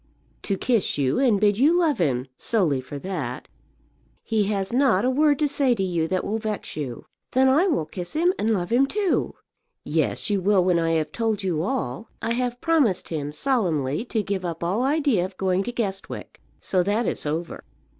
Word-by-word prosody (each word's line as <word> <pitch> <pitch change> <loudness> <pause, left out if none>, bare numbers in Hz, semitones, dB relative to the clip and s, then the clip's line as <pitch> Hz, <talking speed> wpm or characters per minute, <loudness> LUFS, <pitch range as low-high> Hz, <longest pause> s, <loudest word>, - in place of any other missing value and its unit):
"To 195 - -1
kiss 230 -3 +1
you, 135 -2 +1
and 240 -7 +3
bid 205 0 +2
you 310 +6 +5
love 325 - +2
him; 130 -7 +1
solely 165 - +1
for 135 +3 -8
that. 145 -7 -5 0.8
He 215 -2 +1
has 195 0 -2
not 245 -5 +3
a 255 - +3
word 290 +1 +3
to 300 - +2
say 275 -3 +2
to 195 - -1
you 170 -3 0
that 185 +2 -1
will 220 +2 -1
vex 215 -2 -4
you." 135 -6 -5 0.3
"Then 260 +1 +4
I 300 +9 +4
will 290 - +1
kiss 175 +2 -7
him, 345 +4 +2
and 220 - +1
love 185 -4 0
him, 260 +3 +4
too." 400 +2 0 0.5
"Yes, - - 0
you 200 -2 +1
will 195 -1 +3
when 180 -1 +2
I 165 0 +1
have 160 -1 0
told 225 -3 -1
you 170 -5 0
all. 190 - -3
I 225 - -2
have 245 0 -2
promised 295 - +2
him 150 -3 -3
solemnly 160 - 0
to 220 -3 -1
give 195 -1 -3
up 170 -2 -4
all 190 +7 0
idea 275 - +2
of 185 0 -6
going 185 -1 +1
to - - -3
Guestwick. 200 -5 -5 0.2
So 185 - +1
that 205 +6 0
is - - -2
over." 160 +3 -4
200 Hz, 200 wpm, -24 LUFS, 175-250 Hz, 0.8 s, you